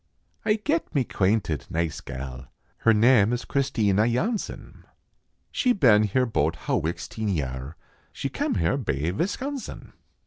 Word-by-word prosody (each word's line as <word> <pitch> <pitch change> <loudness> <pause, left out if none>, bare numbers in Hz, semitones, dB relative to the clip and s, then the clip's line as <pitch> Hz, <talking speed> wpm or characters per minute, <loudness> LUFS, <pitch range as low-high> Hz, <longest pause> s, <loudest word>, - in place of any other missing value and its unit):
Ay 210 - +4
get 295 - -1
mae 135 - +3
quainted 95 - 0
nice 85 -1 -2
gal, 65 -1 -7 0.3
Her 115 - +4
nam 110 -1 +5
is 120 - -3
Christina 110 -7 +2
Yohnsen; 185 - -2 0.7
She 250 -2 +2
been 120 - +5
here 125 +5 +2
bote 115 - 0
hawixteen 95 +7 -2
yar, 65 -4 -3 0.4
She - - -3
kem - - -2
hare 85 +9 +1
bay 80 - -1
Visconsen. 255 - -4
110 Hz, 130 wpm, -25 LUFS, 80-140 Hz, 0.7 s, nam